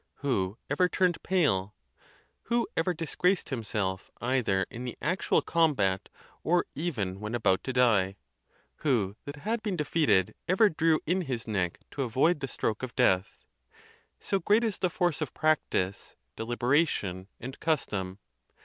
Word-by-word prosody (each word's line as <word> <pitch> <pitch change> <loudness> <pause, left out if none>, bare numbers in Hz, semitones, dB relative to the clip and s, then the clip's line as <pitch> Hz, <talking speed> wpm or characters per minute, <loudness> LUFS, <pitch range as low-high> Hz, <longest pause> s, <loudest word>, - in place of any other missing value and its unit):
who 100 -6 0
ever 180 +6 +2
turned 180 -2 +1
pale? 105 - +1 0.7
who 235 0 +1
ever 165 +3 +1
disgraced 175 +2 0
himself 105 -7 -2
either 120 -7 +1
in 120 - -6
the 125 -2 -5
actual 180 +5 +1
combat, 130 - +1 0.3
or 175 +2 +2
even 110 - -2
when 105 +3 -3
about 95 -5 +2
to 130 - -2
die? 110 -7 +3 0.6
who 110 -10 +1
that 145 - -6
had 215 +10 -2
been 210 -4 -2
defeated 140 - +2
ever 200 +4 +5
drew 160 -1 +2
in 180 +4 +1
his 125 -8 -4
neck 95 -5 -1
to 140 - -4
avoid 135 +7 +2
the 135 - -3
stroke 110 -4 -2
of 130 -1 -6
death? 95 -7 +1 0.7
So 195 - -1
great 210 +6 +3
is 220 -4 -1
the 185 - +1
force 175 -3 0
of 155 - -3
practice, 145 -11 0 0.2
deliberation, 120 - 0
and 130 +3 -7
custom! 105 - -1
130 Hz, 145 wpm, -29 LUFS, 100-165 Hz, 0.7 s, ever